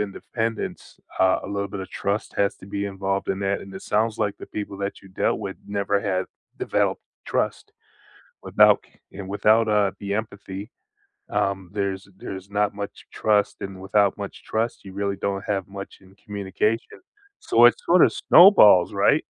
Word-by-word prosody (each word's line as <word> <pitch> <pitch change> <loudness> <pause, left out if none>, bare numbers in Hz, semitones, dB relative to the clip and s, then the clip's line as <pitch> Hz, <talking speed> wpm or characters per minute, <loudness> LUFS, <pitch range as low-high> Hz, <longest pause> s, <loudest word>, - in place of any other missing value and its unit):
independence, 115 +2 -4 0.2
uh, 95 0 +4
a - - -6
little 100 0 -2
bit 100 0 -6
of 95 - -8
trust 100 +2 -3
has 100 0 +1
to 95 - -13
be 100 0 -3
involved 95 0 -2
in 95 - -1
that, 100 0 0
and 95 - -11
it 95 - -8
sounds 110 +1 0
like 105 -2 -1
the - - -9
people 100 -2 -6
that 100 0 -4
you - - -15
dealt 95 - 0
with - - -5
never 100 0 0
have 95 -2 -1 0.3
developed - - 0 0.3
trust. - - -2 0.7
Without - - +5 0.3
c 100 - -8
Without, 110 +3 +3
uh, 105 -2 +2
the 100 -1 -3
empathy, 100 0 -5 0.6
um, 95 -2 -1
there's 100 -2 -3
there's 95 0 -8
not 105 0 0
much 100 -1 -7
trust, 105 -2 +1
and 95 -1 -6
without 100 +1 +2
much 100 -1 -7
trust, 115 +2 -2
you 95 - -9
really 100 0 -2
don't 100 0 -2
have 100 -2 -2
much 100 0 -9
in 95 +1 -20
communication, 105 +2 -3 0.4
so - - +5
it's - - +4
sorta - - +6
snowballs, 105 - +7
right? - - +3
100 Hz, 170 wpm, -24 LUFS, 95-105 Hz, 0.7 s, snowballs